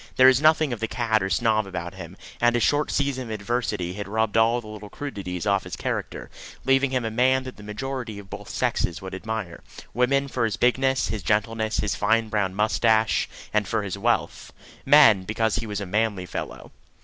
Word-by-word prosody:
There 130 - +6
was 130 +1 +6
nothing 155 -3 +4
of 115 - -5
the 115 - -1
cad 110 -2 0
or 95 - -1
snob 110 0 +1
about 90 -1 -5
him, 95 0 -10 0.2
and 120 0 +4
his 120 - +1
short 150 +1 +2
season 140 -3 -1
of - - -9
adversity 105 -5 -2
had 100 +1 -6
rubbed 110 +1 -1
all 115 +2 +4
the 120 - -12
little 105 -1 -9
crudities 100 -9 -5
off 100 -1 +2
his - - -6
character, - - -4 0.3
leaving 135 +1 +3
him 130 -3 -1
a 110 - -2
man 130 +3 +2
that 130 -1 -9
the - - -12
majority 120 +1 -5
of 100 -1 -10
both - - -9
sexes 85 - -1
would 95 - -7
admire: 105 -2 -5 0.3
women 135 +3 +2
for 125 -3 -1
his 110 - -2
bigness, 130 0 +2
his 110 -1 -3
gentleness, 110 +1 0
his 105 - 0
fine 115 0 +1
brown 100 -3 -1
moustache 110 +1 +2 0.2
and 105 -2 +1
for 110 +2 -1
his 100 -2 -4
wealth; 115 +4 -1 0.4
men, 105 -4 +7
because 110 +3 -1
he 115 -1 -4
was 105 -1 -3
a 100 - -4
manly 100 -1 -1
fellow. - - -7
110 Hz, 205 wpm, -24 LUFS, 100-125 Hz, 0.4 s, men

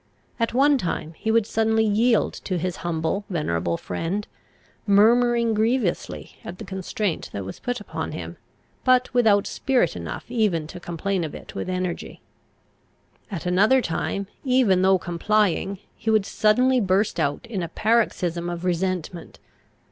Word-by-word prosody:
At 230 +1 0
one 280 +1 +4
time 165 -4 -3
he 220 - -4
would 225 -1 +3
suddenly 220 0 +2
yield 220 +2 +2
to 185 - -1
his 180 +1 -2
humble, 165 +3 -2
venerable 85 - -1
friend, 170 - -3 0.6
murmuring 235 +3 +4
grievously 220 -2 -1
at 175 - -7
the 215 - -8
constraint 190 -1 -3
that 100 -2 -4
was 95 - -8
put 245 0 -3
upon 205 - -5
him, - - -7 0.5
but 255 0 +3
without 220 -5 +4
spirit 265 -2 +1
enough - - -6
even 200 -9 +1
to 160 - -9
complain 175 +2 -2
of 155 - -5
it - - -10
with - - -4
energy. 185 -1 -3 1.1
At 185 -6 -5
another 205 +9 +4
time, 200 -1 -2 0.2
even 250 -9 +3
though 190 0 +5
complying, 195 +2 0 0.2
he 225 - -4
would 215 -3 +3
suddenly 250 +6 +3
burst 195 +1 +1
out 145 +7 -1
in 220 -5 -4
a 170 - -4
paroxysm 180 -5 0
of 175 +1 -5
resentment. 180 -1 -2
200 Hz, 150 wpm, -24 LUFS, 175-225 Hz, 1.1 s, though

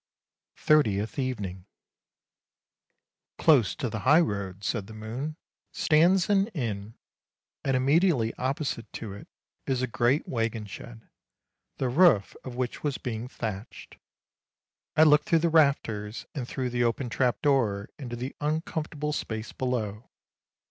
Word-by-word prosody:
THIRTIETH 110 -8 +2
EVENING 100 -9 -3 1.3
" - - -59
Close 135 - +4
to 130 - -2
the 110 -1 -4
high 145 +8 +5
road," 100 - -2
said 105 -2 -2
the 110 - -10
moon, 120 +8 -5 0.2
" - - -66
stands 170 +4 +4
an 200 -1 +3
inn, 110 -5 -3 0.7
and 135 -2 +2
immediately 140 -3 +3
opposite 130 -4 -3
to 110 -4 -6
it 100 - -11 0.4
is 130 -1 0
a - - +4
great 125 +4 +1
waggon 115 -2 -2
shed, 115 +3 -10 0.7
the 130 - 0
roof 130 - +4
of 130 -2 -7
which 125 -1 -3
was 145 -3 -1
being 115 -1 -4
thatched. 110 -3 -7 1.0
I 155 - +8
looked 150 -1 +5
through 165 - +5
the - - +3
rafters, 120 -9 +1
and 130 -4 -4
through 130 -2 -3
the 120 0 +1
open 120 +2 0
trap 120 -2 +1
door 110 -8 +2
into 120 -4 -5
the 125 +3 -5
uncomfortable 150 -1 -2
space 110 -6 -4
below. 115 -4 -3
125 Hz, 140 wpm, -27 LUFS, 110-150 Hz, 1.3 s, I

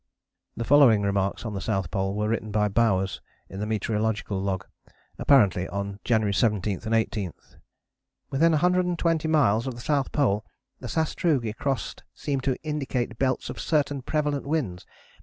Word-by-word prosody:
" - - -48
The 115 - -2
following 125 -6 +6
remarks 100 +2 -1
on 110 - -3
the 95 - -4
South 95 -5 -2
Pole 95 0 0
area 100 - -4
were 105 0 0
written 110 -1 -2
by 105 0 +2
Bowers 95 -3 +1 0.3
in 95 - -7
the 105 - -2
Meteorological 105 -2 -1
Log, 95 -1 -2 0.5
apparently 100 -9 +4
on 100 0 -4
January 110 -4 +2
17 105 -2 +1
and 110 +1 +1
18: 110 -4 0 1.0
"Within 165 +5 +4
120 170 -1 +1
miles 135 -7 +3
of 130 - -4
the - - -9
South 140 0 0
Pole 105 -8 +1 0.4
the - - -7
sastrugi 155 -7 0
crossed 130 -1 -3
seem 140 -2 -2
to 130 -1 0
indicate 135 -6 -3
belts 130 -1 0
of - - -9
certain 145 -3 0
prevalent 145 0 -1
winds. 125 - -2
115 Hz, 160 wpm, -26 LUFS, 100-145 Hz, 1.0 s, following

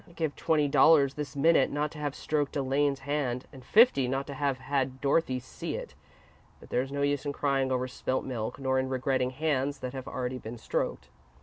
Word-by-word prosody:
I'd 170 - -18
give 160 -4 -2
twenty 150 -2 +2
dollars 145 -1 +5
this 145 -3 -6
minute 145 -1 +4
not 150 +1 -1
to 155 - -10
have 145 -2 -3
stroked 145 -2 -1
Elaine's 140 0 +1
hand, 135 -3 -2
and 130 -2 -12
fifty 210 - +5
not 135 +2 -1
to 140 - -7
have 140 -1 -1
had 130 0 -2
Dorothy 140 -2 +1
see 125 - -6
it, - - -7 0.7
but - - -15
there's 130 +2 0
no 140 0 -1
use 145 -1 +1
in 145 -1 -3
crying 135 -2 0
over 130 0 0
spilt 130 +1 -2
milk 115 -4 -4
nor 130 -1 +1
in 130 0 -1
regretting 130 0 0
hands 140 0 -1
that 125 0 -4
have 130 -1 -6
already 130 0 -3
been 115 +1 -7
stroked." 110 - -3
135 Hz, 205 wpm, -29 LUFS, 130-145 Hz, 0.7 s, dollars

